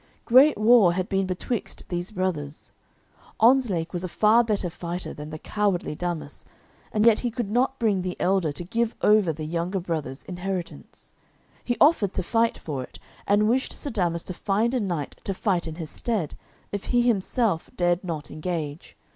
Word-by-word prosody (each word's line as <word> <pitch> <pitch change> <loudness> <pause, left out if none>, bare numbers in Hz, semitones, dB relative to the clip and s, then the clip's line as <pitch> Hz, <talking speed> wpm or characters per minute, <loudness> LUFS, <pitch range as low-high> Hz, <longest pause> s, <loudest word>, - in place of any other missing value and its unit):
Great 265 +4 +6
war 215 -4 +6
had 185 +1 -2
been 195 -1 0
betwixt 190 +5 -4
these 175 0 -2
brothers. 175 -7 -3 0.7
Ontzlake 225 -9 +3
was 175 0 -2
a - - -2
far 215 +6 +4
better 210 -5 -1
fighter 175 +1 -5
than 150 +1 -8
the 155 - -6
cowardly 200 -1 -1
Damas, 155 -3 -5 0.5
and 215 +1 +2
yet 230 -2 +6
he 245 - -1
could 230 -3 -4
not 260 +3 +1
bring 210 -5 +1
the 180 0 -4
elder 185 -4 +2
to 145 - -6
give 230 +6 -1
over 210 -5 +5
the 155 0 -6
younger 170 +4 -2
brother's 155 -6 -4
inheritance. 180 -1 -6 0.5
He 240 - -1
offered 280 - +4
to 185 - -1
fight 230 +5 +1
for 145 -5 -5
it, 125 - -10 0.3
and 205 +1 +4
wished 255 +4 +1
Sir 285 - -5
Damas 175 -6 0
to 185 - -6
find 210 +6 0
a 255 - +1
knight 175 - -3
to 195 - -3
fight 180 -4 0
in 160 - -6
his 160 -3 -7
stead, 210 -11 -2 0.4
if 205 -1 -4
he 245 -1 +2
himself 220 -4 +1
dared 175 +1 +1
not 160 -5 -5
engage. 155 -2 -5
185 Hz, 180 wpm, -25 LUFS, 170-220 Hz, 0.7 s, Great